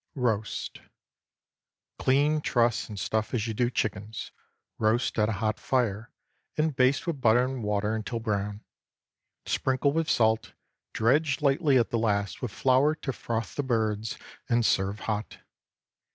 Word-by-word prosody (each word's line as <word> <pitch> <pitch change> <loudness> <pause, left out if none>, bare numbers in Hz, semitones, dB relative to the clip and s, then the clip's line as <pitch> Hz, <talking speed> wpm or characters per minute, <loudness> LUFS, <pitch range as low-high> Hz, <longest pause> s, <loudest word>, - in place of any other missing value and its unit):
ROAST. 110 -5 -2 1.2
Clean, 145 +3 +3
truss, 120 -5 +1
and 105 -2 -6
stuff 110 +5 -1
as 110 -3 0
you 115 - -2
do 120 +2 +1
chickens; 105 -2 -3 0.5
roast 110 +2 +1
at 105 0 +3
a - - 0
hot 110 +2 -1
fire, 115 -4 -1 0.5
and 155 -2 +1
baste 130 +2 +3
with 160 -6 -3
butter 120 +1 +4
and 130 -1 -4
water 105 +1 0
until 110 +2 -3
brown; 105 -2 -2 0.8
sprinkle 135 +2 +1
with 165 0 0
salt, 110 -1 +2 0.4
dredge 140 +5 +2
lightly 140 0 +3
at 120 - +1
the 115 - +1
last 100 -5 0
with 125 - -2
flour 135 +7 +3
to 135 -3 -4
froth 115 -2 -3
the - - -1
birds, 110 -4 -1 0.3
and 120 -1 +2
serve 100 +2 +1
hot. 105 -1 -3
115 Hz, 145 wpm, -28 LUFS, 110-130 Hz, 1.2 s, butter